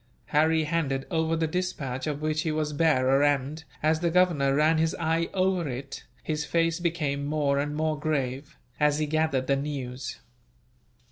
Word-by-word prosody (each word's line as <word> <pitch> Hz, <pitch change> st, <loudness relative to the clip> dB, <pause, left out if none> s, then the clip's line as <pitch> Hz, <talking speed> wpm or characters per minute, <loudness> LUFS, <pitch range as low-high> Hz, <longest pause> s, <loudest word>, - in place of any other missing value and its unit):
Harry 160 Hz, +2 st, +4 dB
handed 150 Hz, -4 st, -1 dB
over 160 Hz, -1 st, +1 dB
the 165 Hz, 0 st, +1 dB
despatch 155 Hz, -7 st, -3 dB
of 150 Hz, 0 st, -3 dB
which 155 Hz, 0 st, 0 dB
he 160 Hz, -, -1 dB
was 155 Hz, -1 st, -1 dB
bearer 140 Hz, -3 st, +3 dB
and, 145 Hz, +2 st, 0 dB, 0.2 s
as 155 Hz, +1 st, +3 dB
the 170 Hz, 0 st, +1 dB
Governor 165 Hz, -6 st, +3 dB
ran 155 Hz, +2 st, +3 dB
his 160 Hz, 0 st, +1 dB
eye 165 Hz, 0 st, 0 dB
over 185 Hz, -4 st, +1 dB
it, 135 Hz, +2 st, -6 dB, 0.2 s
his 150 Hz, -1 st, -2 dB
face 165 Hz, +3 st, +1 dB
became 155 Hz, -5 st, -1 dB
more 145 Hz, -1 st, +1 dB
and 145 Hz, +1 st, -2 dB
more 155 Hz, -1 st, -1 dB
grave, 140 Hz, -2 st, -2 dB, 0.2 s
as 150 Hz, -1 st, +3 dB
he 155 Hz, -, 0 dB
gathered 155 Hz, -3 st, 0 dB
the 140 Hz, -, +2 dB
news. 130 Hz, -2 st, -5 dB
155 Hz, 165 wpm, -27 LUFS, 140-160 Hz, 0.2 s, Harry